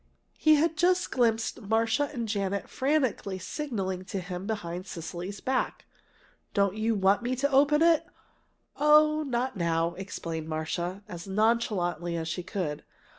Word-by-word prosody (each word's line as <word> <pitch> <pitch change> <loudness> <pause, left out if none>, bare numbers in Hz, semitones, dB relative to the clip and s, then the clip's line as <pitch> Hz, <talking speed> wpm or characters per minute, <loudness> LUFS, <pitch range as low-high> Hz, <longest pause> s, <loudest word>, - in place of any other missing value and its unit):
He 310 0 +6
had 320 +1 +1
just 360 +2 +2
glimpsed 230 -2 +1
Marcia 225 +6 +1
and 235 -5 -3
Janet 200 -2 -1
frantically 260 -9 0
signaling 190 - -3
to 195 - -4
him 180 +1 -6
behind 185 -4 -4
Cecily's 175 +3 -6
back. 260 0 -1 0.7
"Don't 200 -1 +2
you 220 +1 +1
want 195 +2 +3
me 245 +2 -1
to 280 +3 0
open 290 +3 +5
it?" 335 -2 +4 0.7
"Oh, 305 +1 +5
not 260 -3 -1
now," 170 -1 +1
explained 165 -4 -5
Marcia, 175 +5 -3
as 175 +1 -8
nonchalantly 190 -6 +1
as 160 -1 -3
she 170 +3 -3
could. 175 -5 -4
205 Hz, 140 wpm, -28 LUFS, 180-265 Hz, 0.7 s, He